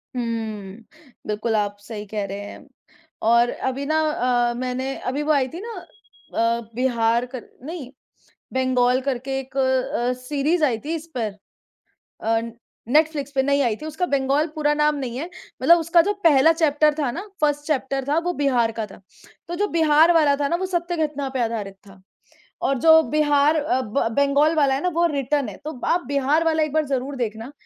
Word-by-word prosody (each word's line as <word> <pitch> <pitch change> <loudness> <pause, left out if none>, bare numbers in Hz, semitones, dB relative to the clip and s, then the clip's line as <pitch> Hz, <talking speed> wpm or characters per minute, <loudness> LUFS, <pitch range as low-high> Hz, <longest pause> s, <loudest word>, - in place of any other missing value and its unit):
हुँ। 220 -5 -4 0.5
बिल्कुल, 215 +2 -1
आप 205 -1 -1
सही 210 0 -8
कह 205 0 -3
रहे 195 +1 -6
हैं। 205 - -10 0.6
और 235 +2 +4
अभी 265 +2 -3
ना 315 +1 +1
अ, 245 -6 +1
मैंने 255 +2 -3
अभी 275 +4 -2
वो 310 - +1
आई 275 -3 +2
थी 330 +7 -8
ना 460 +1 -7
अ, 235 - -4
बिहार 235 -1 +1
कर 250 -1 -8 0.2
नहीं, 310 -5 -6 0.6
बंगाल 255 -1 +2
करके 270 0 -2
एक 265 0 -9
अ, 260 -2 +1
सीरीज़ 295 +5 0
आई 240 -6 0
थी, 325 +2 -2
इस 320 +1 -7
पर 215 -4 -2 0.9
अ, 225 0 +2 0.5
नेटफ्लिक्स 295 0 +2
पे 265 - +4
नई 280 +1 +2
आई 235 -5 +1
थी। - - -6
उसका 315 +3 -2
बंगाल 280 +3 +2
पूरा 295 -1 +1
नाम 300 0 +2
नहीं 255 -3 -4
है। 305 - -3 0.4
मतलब 340 0 +6
उसका 335 +1 +4
जो 410 +5 0
पहला 305 -1 +6
चैप्टर 305 -2 +3
था 280 -5 0
ना, 240 - -5 0.2
1st 290 -1 +1
चैप्टर 270 -3 -1
था, 300 - +2
वो 355 +1 -2
बिहार 255 -7 +1
का 220 - -1
था। 200 - -15 0.5
तो 345 - -4
जो 410 +3 0
बिहार 315 +1 +5
वाला 300 -4 +4
था 285 0 -1
ना, 340 - 0
वो 375 - -2
सत्य 350 -1 -2
घटना 285 -2 -5
पे 260 -2 -2
आधारित 215 -4 -4
था, 190 -1 -16 0.6
और 275 - +1
जो 320 +3 +7
बिहार 295 +1 +3
अ, 295 -3 0
ब 225 +1 -1
बंगाल 285 +3 +3
वाला 280 -3 +3
है 270 - -1
ना, 360 - +1
वो 345 0 +2
रिटर्न 275 -2 0
है। 195 - -8
तो 300 -5 -6
आप 350 +1 +1
बिहार 285 +3 +1
वाला 320 -1 +2
एक 305 - -1
बार 310 0 +2
ज़रूर 270 0 -2
देखना। 230 +2 -4
275 Hz, 190 wpm, -22 LUFS, 240-310 Hz, 0.9 s, जो